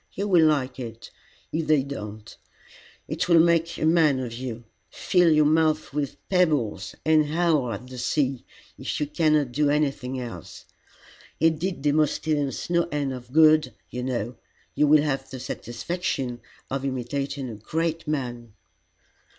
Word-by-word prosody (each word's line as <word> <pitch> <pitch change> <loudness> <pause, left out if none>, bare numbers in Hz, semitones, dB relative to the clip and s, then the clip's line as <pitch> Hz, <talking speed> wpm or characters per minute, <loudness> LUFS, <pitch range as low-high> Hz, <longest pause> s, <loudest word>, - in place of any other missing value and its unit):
You 200 +2 -2
will 170 -5 +5
like 135 -4 0
it, 115 -2 -8 0.4
if 160 0 -1
they 150 -3 +4
don't. 110 -6 -8 0.7
It - - -2
will 170 -1 +7
make 170 0 +3
a - - -1
man 160 -4 +4
of 125 -3 -4
you. 120 -1 -6 0.3
Fill 180 -2 +2
your 155 -1 +5
mouth 155 -1 +2
with 145 -2 -2
pebbles, 145 - +1
and 155 -1 +4
howl 155 -5 +1
at 105 +3 -6
the 125 0 -9
sea, 135 -1 0 0.4
if - - -3
you 150 - +1
cannot 150 -3 +1
do 145 +3 +1
anything 135 -3 0
else. 115 - -8 0.7
It 160 -1 +3
did 180 -5 -3
Demosthenes 150 -1 0
no 170 -1 +3
end 145 -2 -1
of 125 -1 -9
good, 155 -4 +5 0.2
you 125 - -4
know. 120 -2 -3 0.4
You 150 - +3
will 150 0 +6
have 135 -3 -2
the 130 - -7
satisfaction 125 0 -4 0.3
of 135 0 -2
imitating 135 +1 -3
a - - -7
great 165 +8 -2
man." 120 -6 -3
145 Hz, 150 wpm, -25 LUFS, 125-155 Hz, 0.7 s, will